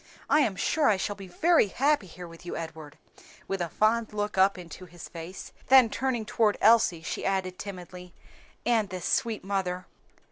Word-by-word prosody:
"I - - +4
am 220 -10 +2
sure 300 +9 +1
I 205 - +3
shall 205 +2 -3
be 195 -1 -10
very 320 - +3
happy 275 0 +1
here 175 +1 -10
with 165 +1 -14
you, 175 - -5
Edward," 160 -3 -8 0.5
with 195 -1 -2
a 170 - -2
fond 220 +4 +1
look 210 0 -2
up 190 +1 +4
into 180 +1 -10
his 175 0 -11
face; 170 +3 -9 0.2
then 255 -4 +6
turning 255 -4 -1
toward 215 -1 +1
Elsie, 210 -7 +4
she - - -4
added 190 -1 -1
timidly, 180 -2 -8 0.5
"and 225 -4 +2
this 185 -1 -6
sweet 225 -2 0
mother." 185 -2 -2
195 Hz, 180 wpm, -27 LUFS, 180-220 Hz, 0.5 s, then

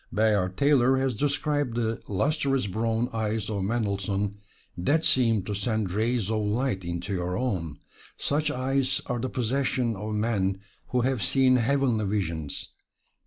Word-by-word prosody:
Bayard 100 -3 +1
Taylor 135 -2 +4
has 130 -1 +1
described 145 0 0
the 115 -1 -1
lustrous 135 - +1
brown 115 +4 0
eyes 110 -1 -1
of 100 -2 -1
Mendelssohn, 100 -2 -1 0.4
that 150 - +1
seemed 115 -6 +3
to 105 - -3
send 105 -1 -1
rays 110 +1 0
of 110 -1 +1
light 105 -1 0
into 85 +3 -3
your 90 0 -2
own: 90 - -2 0.4
"Such 150 +2 0
eyes 130 0 0
are 125 - -2
the 130 +2 -2
possession 125 -1 0
of 105 +2 -4
men 100 -3 0 0.3
who 125 - +1
have 130 -2 0
seen 130 +1 +4
heavenly 125 -3 +1
visions. 85 -7 -3
110 Hz, 145 wpm, -27 LUFS, 100-130 Hz, 0.4 s, Taylor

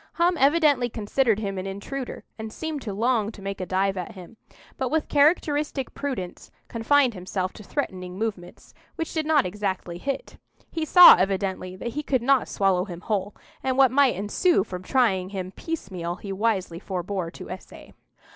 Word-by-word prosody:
Hum 350 +1 +2
evidently 285 -3 +4
considered 225 +1 +1
him 200 -3 -3
an 185 - -5
intruder, 240 +7 -6 0.2
and 220 0 -6
seemed 315 +2 -4
to 215 - -5
long 220 +1 +1
to - - -13
make 195 -1 -4
a 185 - -4
dive 195 +1 0
at 180 - -5
him; 185 +3 -12 0.4
but, 260 -2 -2
with 315 +2 0
characteristic 295 -2 +2
prudence, 255 -11 -5 0.2
confined 250 +2 +2
himself 185 0 -3
to 210 - -11
threatening 185 -8 -4
movements, 195 -5 -5 0.2
which 325 - -4
did 315 -2 -1
not 310 -3 +4
exactly 185 -2 -3
hit. 275 - -4 0.3
He 325 -1 -2
saw 360 +3 +10
evidently 190 -1 -1
that 215 +5 -5
he 285 +6 -3
could 260 -5 0
not 270 0 +3
swallow 190 -2 +1
him 175 -4 -8
whole, 205 -1 -2 0.3
and 260 -1 -1
what 265 -3 +6
might 275 -3 +4
ensue 205 - +2
from 180 -3 -7
trying 190 -4 +1
him 185 -2 -5
piecemeal 185 - -5
he 195 +2 -6
wisely 190 -5 -1
forbore 185 -1 -3
to - - -9
essay. 185 - -10
210 Hz, 175 wpm, -25 LUFS, 185-275 Hz, 0.4 s, saw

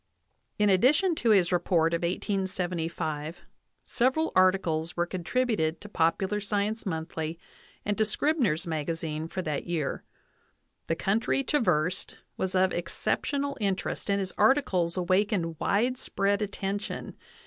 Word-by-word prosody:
In 210 -1 +3
addition 290 - +4
to 240 -7 0
his 190 -5 +4
re 180 - +3
port 165 -2 +2
of 170 - +1
1875, 175 -4 -2 0.5
several 265 +6 +1
articles 180 -3 +2
were 175 - +2
contributed 180 -2 0
to 210 - -10
Popular 190 +3 +1
Sci 205 0 -1
ence 215 +1 -3
Monthly 160 -1 -3 0.5
and 205 - 0
to - - +5
Scribners 220 - +1
Magazine 160 0 -3
for 185 +2 -4
that 150 -1 -3
year. 165 -5 -2 0.8
The 165 - +1
country 220 +9 +1
traversed 185 - 0 0.2
was 190 0 -2
of 185 0 +3
exceptional 280 - -1
interest 195 0 -2
and 200 - +3
his 190 -2 -3
articles 205 -8 +3
awakened 185 -2 +1
widespread 205 -3 +1
attention. 200 0 -4
185 Hz, 125 wpm, -28 LUFS, 165-210 Hz, 0.8 s, to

